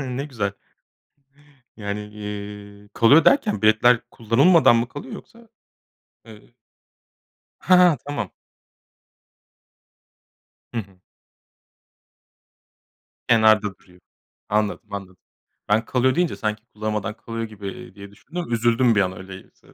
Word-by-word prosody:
Ne 130 Hz, +1 st, -4 dB
güzel. 105 Hz, -8 st, -3 dB, 1.2 s
Yani, 100 Hz, -1 st, -4 dB
eee, 105 Hz, -1 st, -9 dB
"kalıyor" 140 Hz, +10 st, +5 dB
derken, 215 Hz, -, +3 dB
biletler 110 Hz, +3 st, +4 dB
kullanılmadan 125 Hz, +5 st, +4 dB
mı 115 Hz, +1 st, 0 dB
kalıyor 140 Hz, 0 st, -9 dB
yoksa? 230 Hz, -1 st, -14 dB, 0.8 s
Eee 110 Hz, +2 st, -16 dB, 1.0 s
Ha, 185 Hz, -, +4 dB
ha, 155 Hz, -, -1 dB
tamam. 145 Hz, 0 st, -4 dB, 2.4 s
Hı -, -, -1 dB
hı. 95 Hz, -3 st, -16 dB, 2.3 s
Kenarda 110 Hz, -3 st, +4 dB
duruyor. 90 Hz, -1 st, -23 dB, 0.5 s
Anladım, 105 Hz, 0 st, -2 dB
anladım. 95 Hz, -2 st, -7 dB, 0.5 s
Ben, 110 Hz, +2 st, +2 dB
"kalıyor" 130 Hz, +2 st, +1 dB
deyince 175 Hz, 0 st, 0 dB
sanki 110 Hz, -2 st, -3 dB
kullanmadan 105 Hz, -1 st, -3 dB
kalıyor 115 Hz, 0 st, -6 dB
gibi, 105 Hz, -3 st, -8 dB
eee, 90 Hz, -, -12 dB
diye 100 Hz, 0 st, -11 dB
düşündüm. 160 Hz, +7 st, -7 dB
Üzüldüm 120 Hz, +1 st, +2 dB
bir 100 Hz, -, +3 dB
an 95 Hz, -1 st, -1 dB
öyleyse 95 Hz, 0 st, -13 dB
110 Hz, 105 wpm, -22 LUFS, 100-125 Hz, 2.4 s, kalıyor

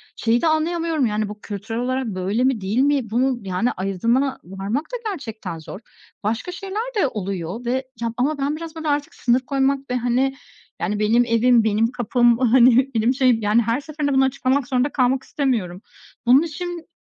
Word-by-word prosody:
şeyi 230 Hz, +1 st, +1 dB
de 330 Hz, -, +2 dB
anlayamıyorum, 320 Hz, -2 st, +1 dB
yani 210 Hz, -1 st, -1 dB
bu 210 Hz, 0 st, -9 dB
kültürel 220 Hz, +3 st, -5 dB
olarak 255 Hz, 0 st, -1 dB
böyle 200 Hz, +4 st, -1 dB
mi 260 Hz, -6 st, +1 dB
değil 200 Hz, +5 st, -2 dB
mi? 275 Hz, -5 st, +2 dB
Bunu, 250 Hz, +2 st, +1 dB
yani, 205 Hz, +7 st, 0 dB
ayırdına 230 Hz, +9 st, 0 dB
varmak 195 Hz, -, -3 dB
da -, -, 0 dB
gerçekten 225 Hz, -, -6 dB
zor. 185 Hz, +5 st, -9 dB, 0.4 s
Başka 225 Hz, -, -2 dB
şeyler 390 Hz, +4 st, -4 dB, 0.2 s
de 285 Hz, -, +3 dB
oluyor 195 Hz, +1 st, -5 dB
ve, 240 Hz, -, 0 dB, 0.3 s
ya, 230 Hz, -1 st, -2 dB
ama 285 Hz, +4 st, 0 dB
ben 280 Hz, +2 st, -1 dB
biraz, 330 Hz, 0 st, -8 dB
böyle, 320 Hz, -1 st, -5 dB
artık 290 Hz, +3 st, -1 dB
sınır 245 Hz, +1 st, +2 dB
koymak 275 Hz, 0 st, -1 dB
ve, 250 Hz, -, 0 dB
hani, 250 Hz, +3 st, +1 dB, 0.5 s
yani, 210 Hz, 0 st, -1 dB
benim 230 Hz, +3 st, +3 dB
evim, 230 Hz, 0 st, +4 dB
benim 220 Hz, +2 st, +1 dB
kapım, 240 Hz, -1 st, +2 dB
hani, 255 Hz, +1 st, +5 dB
benim 225 Hz, +4 st, +2 dB
şeyim, 255 Hz, -4 st, +3 dB
yani 210 Hz, +3 st, +3 dB
her 235 Hz, +5 st, 0 dB
seferinde 295 Hz, -2 st, -2 dB
bunu 265 Hz, 0 st, +4 dB
açıklamak 265 Hz, 0 st, 0 dB
zorunda 260 Hz, +1 st, +1 dB
kalmak 260 Hz, 0 st, +1 dB
istemiyorum. 215 Hz, -10 st, -2 dB, 0.4 s
Bunun 255 Hz, +4 st, +6 dB
için 340 Hz, +1 st, -5 dB
250 Hz, 180 wpm, -22 LUFS, 220-275 Hz, 0.5 s, Bunun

